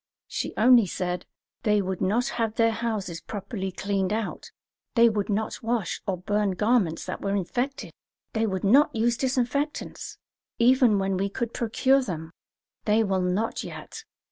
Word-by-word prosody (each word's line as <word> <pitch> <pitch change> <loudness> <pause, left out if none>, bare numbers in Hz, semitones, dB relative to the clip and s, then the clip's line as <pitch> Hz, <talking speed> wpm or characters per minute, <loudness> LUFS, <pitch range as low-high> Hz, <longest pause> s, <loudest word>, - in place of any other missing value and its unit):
She - - -3
only 235 -1 +6
said: 180 0 -3 0.3
"They 210 -1 +3
would 190 -2 -3
not 225 +6 +1
have 225 -2 -2
their 230 -1 +3
houses 215 -7 -3
properly 200 -2 -5
cleaned 195 0 -1
out; 220 0 -3 0.5
they 235 -1 +7
would 210 -2 -2
not 215 +1 -2
wash 230 -5 -1
or 190 -2 0
burn 205 +2 0
garments 210 -6 +1
that - - -5
were 195 0 -1
infected; 250 +9 -2 0.4
they 225 0 +1
would 190 -3 -2
not 255 +9 +5
use 235 +2 +2
disinfectants, 265 +4 -2 0.4
even 245 -2 +5
when 195 -1 0
we 195 +2 0
could 235 +3 -3
procure 260 +4 +2
them; 160 -9 -5 0.5
they 215 +1 +3
will 190 -3 0
not 185 +5 -1
yet. - - -8
215 Hz, 155 wpm, -26 LUFS, 195-235 Hz, 0.5 s, they